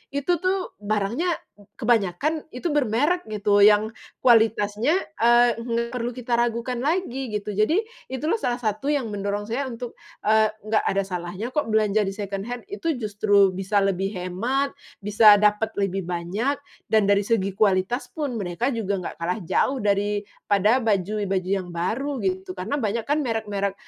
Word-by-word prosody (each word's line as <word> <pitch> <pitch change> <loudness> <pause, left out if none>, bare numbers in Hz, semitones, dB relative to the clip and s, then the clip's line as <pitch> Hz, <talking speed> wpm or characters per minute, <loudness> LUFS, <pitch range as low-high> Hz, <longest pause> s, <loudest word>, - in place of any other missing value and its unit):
itu 320 +5 +1
tuh 370 +1 -1
barangnya, 215 - 0 0.4
kebanyakan 235 - +1
itu 250 +7 -4
bermerek 295 +6 +1
gitu 205 -1 +2
yang 210 +1 +5 0.3
kualitasnya, 225 - +3 0.2
eee, 240 +1 +5
nggak 235 0 -2
perlu 240 0 -2
kita 245 -1 -1
ragukan 235 +1 0
lagi 270 -4 -1
gitu 210 0 -3
jadi, 215 - +3 0.3
itulah 305 - 0
salah 245 -7 -1
satu 220 +3 -2
yang 280 -5 0
mendorong 205 0 -2
saya 255 +5 -2
untuk, 240 0 -7 0.3
eee, 215 0 +4
nggak 215 0 +1
ada 195 +1 +1
salahnya 180 +3 -5
kok 300 -4 0
belanja 215 -1 +3
di - - -1
second 200 -1 -4
hand, 245 0 -5
itu 330 -6 -1
justru 205 -2 +3
bisa 195 +2 0
lebih 195 0 0
hemat, 230 +11 -1 0.3
bisa 210 +1 +7
dapet 210 +1 +1
lebih 195 -1 0
banyak, 180 +10 -1 0.3
dan 220 -1 +4
dari 200 0 +4
segi 200 -2 0
kualitas 200 +4 +1
pun 290 -6 -3
mereka 190 +7 -1
juga 200 -4 -1
nggak - - -6
kalah 180 +5 -2
jauh 260 +10 +1
daripada 205 +2 +1
baju-baju 195 -2 0
yang 190 -2 -1
baru 250 +11 -2
gitu 190 0 -2
karena 185 +10 -2
banyak 225 -1 -1
kan 295 +1 +2
merek-merek 205 -4 -2
215 Hz, 155 wpm, -24 LUFS, 200-245 Hz, 0.4 s, bisa